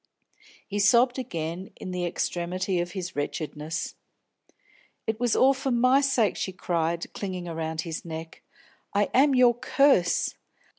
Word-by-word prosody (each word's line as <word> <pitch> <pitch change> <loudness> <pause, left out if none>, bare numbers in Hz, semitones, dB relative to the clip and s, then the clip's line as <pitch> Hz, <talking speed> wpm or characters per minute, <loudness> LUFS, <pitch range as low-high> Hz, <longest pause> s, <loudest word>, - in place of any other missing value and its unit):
He 205 0 -3
sobbed 240 +5 +4
again 170 -4 -4
in 185 - -7
the 180 -1 -1
extremity 175 +2 -2
of 175 0 -3
his 185 -2 -5
wretchedness. 150 +2 -3 1.1
"It 220 0 -2
was 245 -2 +1
all 270 +1 +5
for 270 0 -3
my 255 +3 +4
sake!" 250 -8 +2
she 190 - -3
cried, 170 -2 -2
clinging 185 -3 -5
around 160 -1 -3
his 165 -1 -5
neck. 160 -1 -8 0.5
"I 205 0 +2
am 275 +1 +5
your 250 -1 +6
curse. 245 -6 +2
185 Hz, 140 wpm, -26 LUFS, 170-245 Hz, 1.1 s, your